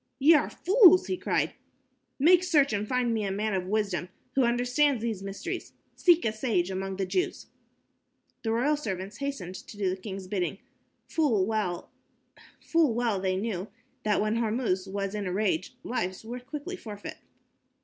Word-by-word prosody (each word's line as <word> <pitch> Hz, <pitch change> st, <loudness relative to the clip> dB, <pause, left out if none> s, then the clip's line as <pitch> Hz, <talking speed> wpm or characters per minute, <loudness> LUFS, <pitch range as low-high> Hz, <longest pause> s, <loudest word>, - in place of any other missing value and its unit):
"Ye 295 Hz, +5 st, +6 dB
are 300 Hz, -2 st, +3 dB
fools," 370 Hz, -2 st, +6 dB
he 370 Hz, -, -1 dB
cried. -, -, 0 dB, 0.6 s
"Make 340 Hz, +5 st, +6 dB
search 300 Hz, -9 st, +3 dB
and 205 Hz, +1 st, -1 dB
find 250 Hz, -1 st, +1 dB
me 220 Hz, -2 st, 0 dB
a 200 Hz, -, -1 dB
man 210 Hz, +2 st, -1 dB
of 185 Hz, -1 st, -1 dB
wisdom 195 Hz, -4 st, -1 dB, 0.2 s
who 270 Hz, -, +3 dB
understands 245 Hz, +2 st, +2 dB
these 220 Hz, -5 st, -2 dB
mysteries. 195 Hz, 0 st, -5 dB, 0.2 s
Seek 345 Hz, -4 st, +4 dB
a 220 Hz, -, +1 dB
sage 210 Hz, -6 st, 0 dB
among 190 Hz, 0 st, -3 dB
the 195 Hz, -, 0 dB
Jews." 360 Hz, -, -1 dB, 1.0 s
The 225 Hz, -, -1 dB
royal 270 Hz, +7 st, +2 dB
servants 195 Hz, -7 st, -5 dB
hastened 275 Hz, -11 st, -4 dB
to 205 Hz, -, -10 dB
do 195 Hz, -3 st, +1 dB
the -, -, -1 dB
king's 195 Hz, -1 st, -6 dB
bidding. 185 Hz, -2 st, -2 dB, 0.5 s
Full 250 Hz, -, +2 dB
well 200 Hz, -5 st, -2 dB, 0.8 s
they 230 Hz, -, +2 dB
knew 195 Hz, -1 st, -3 dB, 0.3 s
that 210 Hz, -3 st, +1 dB
when 215 Hz, +2 st, +1 dB
Hormuz 220 Hz, -4 st, 0 dB
was 195 Hz, 0 st, -3 dB
in 205 Hz, -2 st, -3 dB
a -, -, -2 dB
rage, 190 Hz, +2 st, -1 dB
lives 185 Hz, -4 st, -3 dB
were 240 Hz, +2 st, -5 dB
quickly 290 Hz, +8 st, -6 dB
forfeit. 210 Hz, -, -8 dB
215 Hz, 160 wpm, -28 LUFS, 195-265 Hz, 1.0 s, Ye